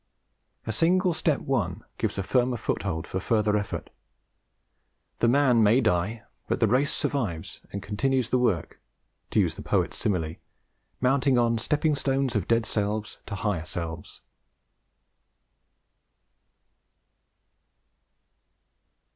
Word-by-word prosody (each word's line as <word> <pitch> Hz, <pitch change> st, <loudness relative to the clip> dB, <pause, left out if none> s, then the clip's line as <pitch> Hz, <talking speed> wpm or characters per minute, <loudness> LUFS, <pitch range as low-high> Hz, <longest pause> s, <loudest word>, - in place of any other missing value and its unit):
A 110 Hz, -, -2 dB
single 180 Hz, -, +2 dB
step 160 Hz, -2 st, +1 dB
won 105 Hz, -10 st, -1 dB, 0.2 s
gives -, -, -1 dB
a 100 Hz, -, -1 dB
firmer 125 Hz, +3 st, +1 dB
foothold 85 Hz, -6 st, -2 dB
for 95 Hz, -, -3 dB
further 105 Hz, +1 st, +1 dB
effort. 105 Hz, -1 st, -3 dB, 1.3 s
The 120 Hz, -, +3 dB
man 125 Hz, -2 st, +4 dB
may 110 Hz, +4 st, +5 dB
die, 110 Hz, -1 st, 0 dB, 0.2 s
but -, -, 0 dB
the -, -, +4 dB
race 130 Hz, +6 st, +2 dB
survives 105 Hz, -, -3 dB
and 100 Hz, 0 st, -5 dB
continues 130 Hz, +3 st, 0 dB
the 125 Hz, -, +2 dB
work, 105 Hz, -10 st, 0 dB, 0.5 s
to -, -, +2 dB
use -, -, +2 dB
the -, -, -9 dB
poet's -, -, 0 dB
simile, 85 Hz, -6 st, -1 dB, 0.6 s
mounting 130 Hz, 0 st, +3 dB
on 115 Hz, -1 st, +2 dB
stepping 150 Hz, +5 st, +1 dB
stones 135 Hz, -3 st, 0 dB
of 100 Hz, -5 st, 0 dB
dead 115 Hz, -1 st, +2 dB
selves 105 Hz, +1 st, -2 dB
to 100 Hz, -, -4 dB
higher 100 Hz, -6 st, -1 dB
selves. 85 Hz, -2 st, -6 dB
115 Hz, 120 wpm, -27 LUFS, 100-130 Hz, 1.3 s, may